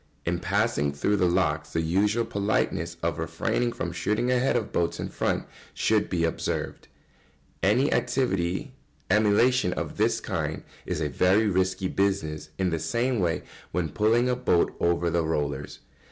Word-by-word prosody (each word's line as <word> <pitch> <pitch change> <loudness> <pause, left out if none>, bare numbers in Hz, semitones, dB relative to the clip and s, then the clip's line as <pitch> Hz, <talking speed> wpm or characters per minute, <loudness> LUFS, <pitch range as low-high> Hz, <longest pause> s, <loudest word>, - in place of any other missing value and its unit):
] 70 +1 -38
In 85 +1 0
passing 100 -5 +1
through 100 +9 0
the 90 -2 +3
locks 85 -4 0
the 80 - +1
usual 100 +8 +1
politeness 95 -5 -1
of 85 -1 -1
refraining 120 +8 -1
from - - -4
shooting 115 +4 0
ahead 125 +1 +2
of 115 -4 -1
boats 85 - 0
in - - -3
front - - -1 0.3
should 110 -1 +1
be 85 -3 0
observed. 80 - -2 0.7
Any 120 +9 +3
active 125 -2 +1 0.8
emulation 105 0 +3
of - - -5
this - - +2
kind - - -3 0.2
is - - -2
a 75 - +1
very 95 +8 +3
risky 95 -1 +1
business 80 -7 -1
in 95 -2 0
the 80 - -1
same 120 - 0
way 85 -3 0 0.3
when 85 -2 -1
pulling 115 +7 +2
a 125 - +2
boat 105 -8 +1
over 85 0 +1
the 85 0 +1
rollers. 75 -3 -2
95 Hz, 160 wpm, -26 LUFS, 85-110 Hz, 0.8 s, the